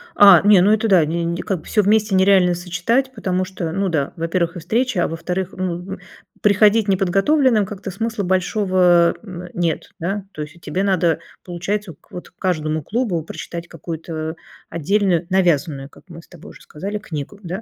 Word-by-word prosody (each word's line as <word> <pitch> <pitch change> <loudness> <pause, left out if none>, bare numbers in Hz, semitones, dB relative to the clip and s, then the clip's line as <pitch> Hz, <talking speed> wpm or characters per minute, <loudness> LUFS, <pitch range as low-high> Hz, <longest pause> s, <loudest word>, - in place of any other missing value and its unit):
А, 200 -4 +8
не, 205 -3 +6
ну, 205 +3 +4
это 220 +1 +2
да 185 -6 +5
не 170 +2 -2
н 170 0 -2
как 185 -3 -3
всё 210 - +2
вместе 210 0 +2
нереально 190 -1 +4
сочетать 185 +10 -1
потому 185 -5 -1
что, 180 -4 -5
ну 195 +2 -1
да, 150 -5 -1
во-первых, 170 +1 -1
и 175 - -5
встречи, 235 +5 -1
а 175 - +2
во-вторых, 180 +3 -3
ну, 185 -2 -3 0.2
м, - - -8 0.4
приходить 210 +1 +4
неподготовленным 200 - +2
как-то 195 0 -7
смысла 225 +1 -3
большого, 185 -2 +2
м, 180 -3 -8
нет, 170 -2 -2
да. 195 +4 -3
То 155 - -7
есть, 150 +2 -11
а, - - -18
тебе 185 +4 -3
надо, 175 -4 +1 0.2
получается, 185 +2 -4 0.2
вот 180 - -9
к - - -39
каждому 155 -4 -1
клубу 215 - -1
прочитать 170 +1 -7
какую-то 160 0 -6 0.3
отдельную, 180 +1 +1
навязанную, 160 -7 +1
как - - -19
мы 165 0 -10
с - - -22
тобой 175 -4 -13
уже - - -16
сказали, 200 +7 -6
книгу, 160 +3 -7
да? 185 +5 -5
185 Hz, 180 wpm, -20 LUFS, 170-200 Hz, 0.4 s, А